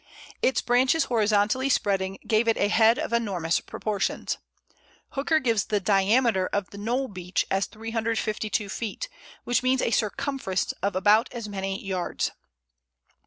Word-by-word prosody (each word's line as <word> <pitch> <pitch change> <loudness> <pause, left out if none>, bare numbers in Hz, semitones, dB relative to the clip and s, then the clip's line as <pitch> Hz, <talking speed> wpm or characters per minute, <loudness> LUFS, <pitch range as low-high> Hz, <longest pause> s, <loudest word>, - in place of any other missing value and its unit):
Its 260 - +2
branches 260 +6 +3
horizontally 220 +3 +2
spreading 195 -5 +1
gave 220 +1 +2
it 225 - +3
a 205 - +2
head 225 +2 +5
of - - -3
enormous 190 -8 +1
proportions. 210 -3 -3 0.7
Hooker 290 +3 +1
gives 230 -8 +1
the 210 -1 0
diameter 195 +1 +3
of 200 -2 -2
the 200 - -9
Knowle 245 +6 -1
Beech 180 -3 -2
as 195 +1 +1
352 220 -1 -2
feet, 230 - -4 0.3
which 245 - +1
means 255 0 +2
a - - +1
circumference 240 -3 -1
of 200 0 -1
about 210 +6 +4
as 235 -3 -6
many 195 -1 -3
yards. 185 -2 -2
215 Hz, 140 wpm, -26 LUFS, 195-240 Hz, 0.7 s, head